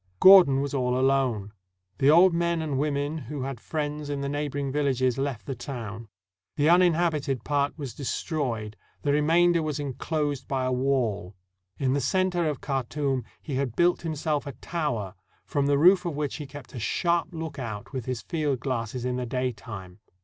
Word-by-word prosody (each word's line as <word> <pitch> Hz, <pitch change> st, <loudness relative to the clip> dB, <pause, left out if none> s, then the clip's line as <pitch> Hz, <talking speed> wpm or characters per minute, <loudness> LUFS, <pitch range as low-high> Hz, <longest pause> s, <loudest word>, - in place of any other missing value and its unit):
Gordon 180 Hz, -8 st, +8 dB
was 140 Hz, 0 st, -3 dB
all 125 Hz, -2 st, +1 dB
alone. 130 Hz, -6 st, +1 dB, 0.5 s
The 135 Hz, -, +4 dB
old 175 Hz, +4 st, +7 dB
men 170 Hz, 0 st, +1 dB
and 150 Hz, -4 st, -2 dB
women 145 Hz, +1 st, -1 dB
who 145 Hz, -1 st, -5 dB
had 135 Hz, -3 st, -4 dB
friends 150 Hz, +1 st, -4 dB
in 140 Hz, -1 st, -2 dB
the 140 Hz, -, -2 dB
neighboring 145 Hz, -1 st, -2 dB
villages 130 Hz, -3 st, +1 dB
left 135 Hz, -5 st, -3 dB
the 135 Hz, -, -3 dB
town. 115 Hz, -3 st, -7 dB, 0.5 s
The 150 Hz, 0 st, +3 dB
uninhabited 165 Hz, -, +3 dB
part 145 Hz, 0 st, 0 dB
was 140 Hz, -6 st, -6 dB
destroyed, 125 Hz, -6 st, -3 dB, 0.3 s
the 145 Hz, -, +2 dB
remainder 165 Hz, +4 st, +4 dB
was 155 Hz, -1 st, -2 dB
inclosed 145 Hz, 0 st, -2 dB
by 130 Hz, -2 st, -1 dB
a 130 Hz, -, 0 dB
wall. 125 Hz, -8 st, 0 dB, 0.4 s
In 130 Hz, -2 st, +1 dB
the 140 Hz, -, +1 dB
center 180 Hz, +1 st, +1 dB
of 145 Hz, -, -4 dB
Khartoum 135 Hz, -1 st, -1 dB, 0.2 s
he 140 Hz, -5 st, -3 dB
had 130 Hz, -4 st, -2 dB
built 175 Hz, +1 st, +3 dB
himself 155 Hz, -2 st, -2 dB
a 140 Hz, -, -5 dB
tower, 120 Hz, -, -3 dB, 0.3 s
from 140 Hz, -1 st, 0 dB
the 140 Hz, 0 st, +3 dB
roof 180 Hz, +5 st, +6 dB
of 170 Hz, -4 st, -3 dB
which 145 Hz, -1 st, -2 dB
he 150 Hz, -, -7 dB
kept 140 Hz, -2 st, -11 dB
a 125 Hz, -, -5 dB
sharp 170 Hz, +9 st, +1 dB
lookout 140 Hz, -, -6 dB
with 130 Hz, -4 st, -4 dB
his 125 Hz, -2 st, -3 dB
field 150 Hz, -6 st, -1 dB
glass 120 Hz, -4 st, -2 dB
in 125 Hz, 0 st, -2 dB
the 125 Hz, -1 st, -3 dB
daytime. 115 Hz, -7 st, -4 dB
140 Hz, 175 wpm, -26 LUFS, 125-155 Hz, 0.5 s, Gordon